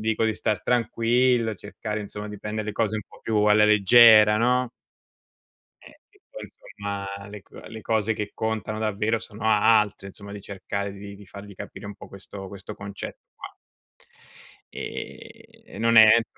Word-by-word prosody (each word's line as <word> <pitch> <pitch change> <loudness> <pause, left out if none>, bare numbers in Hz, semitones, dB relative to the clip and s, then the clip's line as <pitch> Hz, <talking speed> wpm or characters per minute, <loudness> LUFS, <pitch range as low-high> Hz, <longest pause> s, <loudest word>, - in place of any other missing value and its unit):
dico 110 +1 0
di 110 -1 +1
star 105 -1 -2
tranquillo, 120 0 +1
cercare 105 +2 -6
insomma 105 0 -7
di 105 0 -8
prendere 105 +1 -4
le 105 - -2
cose 110 0 -1
un 105 - -4
po' - - -17
più 110 -1 -1
alla 105 0 +5
leggera, 105 +1 +7
no? 125 +1 +1 1.1
Eh, - - -17
che 405 -1 -29
poi - - -9
insomma 100 - -7
le 105 -1 -10
co - - -16
le 110 - -10
cose 110 0 0
che 105 -1 -4
contano 110 -1 -3
davvero 110 +1 0
sono 110 0 -10
altre, 105 -2 +3
insomma 100 +1 -11
di 105 - -8
cercare 100 0 -5
di 100 0 -10
di 100 0 -15
fargli 100 +2 -11
capire 100 - -9
un 105 - -7
po' 100 - -13
questo 95 0 -10
questo 100 +2 -9
concetto 100 0 -8
qua. - - -10 1.2
Ehm, - - -9
non 115 0 +2
è 110 - +11
insomma 115 - +1
105 Hz, 170 wpm, -25 LUFS, 100-110 Hz, 1.2 s, è